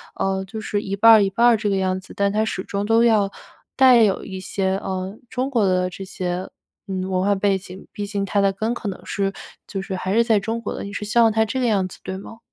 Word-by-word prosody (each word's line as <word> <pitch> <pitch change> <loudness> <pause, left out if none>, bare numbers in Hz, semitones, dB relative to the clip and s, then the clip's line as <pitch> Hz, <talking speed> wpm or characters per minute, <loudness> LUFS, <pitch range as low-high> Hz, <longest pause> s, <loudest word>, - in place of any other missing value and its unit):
呃， 190 0 -1
就 220 +3 -7
是 205 0 -2
一 195 -1 -3
半 225 +3 +7
儿 220 -2 +8
一 195 - +2
半 230 +5 +2
儿 235 -2 +5
这 210 -1 -1
个 200 - +1
样 185 -1 0
子， 185 - -13
但 200 0 +1
他 215 +1 +1
始 190 -3 -3
终 200 +1 -3
都 225 +2 +4
要 215 -4 +3 0.5
带 255 -3 +7
有 200 -3 +1
一 190 -1 -7
些， 190 0 -1
呃， 190 +1 -4
中 260 +1 -2
国 235 -6 +2
的 185 -1 +1
这 195 - -8
些， 185 -1 -4 0.4
嗯， 185 -1 -3
文 185 -1 0
化 200 +1 +2
背 195 0 +1
景， 190 0 -11
毕 205 -2 -5
竟 200 -1 -2
他 200 +1 0
的 195 0 +3
根 220 +4 -2
可 230 - -6
能 190 - -8
是 195 -1 -1 0.4
就 195 -2 -4
是 190 0 -5
还 185 +1 -2
是 230 - +5
在 225 -3 +3
中 225 +4 -3
国 - - -4
的， - - -6
你 200 - -7
是 210 - -4
希 215 +3 +1
望 225 -1 +6
他 220 +1 +2
这 245 +5 -3
个 255 - +1
样 200 -4 +2
子， - - -13
对 190 0 -5
吗？ 225 +3 -11
200 Hz, 290 characters per minute, -22 LUFS, 190-220 Hz, 0.5 s, 儿